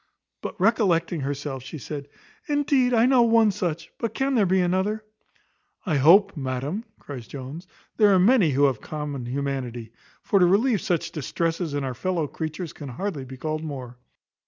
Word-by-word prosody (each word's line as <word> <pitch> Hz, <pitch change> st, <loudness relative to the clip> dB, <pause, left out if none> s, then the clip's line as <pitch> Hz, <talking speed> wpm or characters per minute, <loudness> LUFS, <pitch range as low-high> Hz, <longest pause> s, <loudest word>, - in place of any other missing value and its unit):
But -, -, -6 dB
recollecting 180 Hz, -6 st, +2 dB
herself, 140 Hz, -1 st, -4 dB
she 140 Hz, +5 st, -8 dB
said, 145 Hz, 0 st, -6 dB, 0.4 s
"Indeed 285 Hz, -3 st, +2 dB
I 230 Hz, -1 st, +4 dB
know 255 Hz, -1 st, +5 dB
one 225 Hz, -2 st, +5 dB
such; 170 Hz, -4 st, -3 dB
but 230 Hz, -, -3 dB
can 270 Hz, 0 st, 0 dB
there 215 Hz, -6 st, +3 dB
be 190 Hz, +1 st, +3 dB
another?" 190 Hz, +4 st, 0 dB, 0.8 s
"I 160 Hz, -7 st, +1 dB
hope, 170 Hz, +10 st, +6 dB
madam," 140 Hz, -, -3 dB
cries 130 Hz, -5 st, -9 dB
Jones, 140 Hz, +6 st, -8 dB, 0.3 s
"there 210 Hz, -2 st, +6 dB
are 190 Hz, -, +5 dB
many 195 Hz, -1 st, +5 dB
who 140 Hz, 0 st, +2 dB
have 135 Hz, -2 st, +2 dB
common 145 Hz, -5 st, -5 dB
humanity; 125 Hz, -4 st, -3 dB, 0.3 s
for 200 Hz, -, +3 dB
to 180 Hz, -, +6 dB
relieve 210 Hz, +3 st, +3 dB
such 170 Hz, -1 st, -1 dB
distresses 165 Hz, +1 st, -2 dB
in 145 Hz, -, -1 dB
our 130 Hz, -1 st, -2 dB
fellow 175 Hz, +4 st, -1 dB
creatures, 160 Hz, +3 st, -5 dB
can 145 Hz, -3 st, -8 dB
hardly 150 Hz, +1 st, -4 dB
be 130 Hz, 0 st, -10 dB
called 155 Hz, +3 st, -3 dB
more." 130 Hz, -5 st, -7 dB
165 Hz, 170 wpm, -25 LUFS, 140-200 Hz, 0.8 s, hope